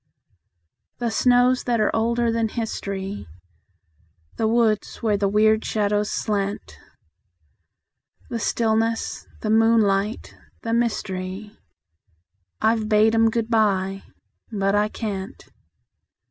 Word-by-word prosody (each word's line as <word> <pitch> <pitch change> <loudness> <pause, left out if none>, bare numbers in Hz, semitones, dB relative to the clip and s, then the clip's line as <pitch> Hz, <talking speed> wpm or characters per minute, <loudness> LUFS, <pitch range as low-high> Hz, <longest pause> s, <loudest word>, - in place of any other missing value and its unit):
The 240 -2 -2
snows 245 +3 +3
that 240 -2 +1
are 215 - +1
older 235 +1 +1
than 230 0 0
history, 200 - -4 1.1
The 220 - +1
woods 225 -2 +1
where 215 -2 +2
the 200 -1 +1
weird 215 +2 +3
shadows 210 -1 0
slant; 200 - -3 1.5
The 235 - -2
stillness, 225 0 -1
the 215 - -1
moonlight, 220 -2 +2 0.3
the 230 - -2
mystery, 210 -3 -2 1.1
I've 220 -1 +2
bade 215 +1 +4
'em 225 0 +4
good 230 0 -2
by 195 -3 +1 0.5
but 195 -2 0
I 205 +1 +3
can't. 200 -4 -6
220 Hz, 105 wpm, -23 LUFS, 205-230 Hz, 1.5 s, bade